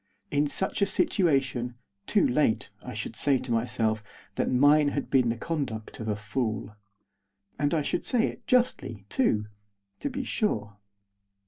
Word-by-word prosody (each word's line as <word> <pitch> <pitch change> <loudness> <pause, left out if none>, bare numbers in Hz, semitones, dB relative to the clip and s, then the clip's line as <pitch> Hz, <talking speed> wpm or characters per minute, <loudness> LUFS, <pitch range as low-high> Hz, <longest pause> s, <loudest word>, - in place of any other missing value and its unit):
In 145 +1 +2
such 190 +7 -1
a 200 - +4
situation, 135 - +1 0.3
too 205 - +4
late, 125 -4 +1
I - - -7
should - - -5
say 140 -2 +3
to 125 0 -5
myself 110 -2 0 0.3
that - - 0
mine 145 +3 +5
had 140 0 -2
been 130 -3 +4
the 115 - -1
conduct 125 -7 -4
of 110 - -5
a 105 - 0
fool. 110 -1 -3 0.8
And 145 0 +2
I 160 -3 +1
should - - -1
say 235 -3 +2
it - - -6
justly 240 - +1
too. 110 - +2 0.5
To 285 - -2
be 270 0 -3
sure. 105 - -1
135 Hz, 155 wpm, -28 LUFS, 110-160 Hz, 0.8 s, mine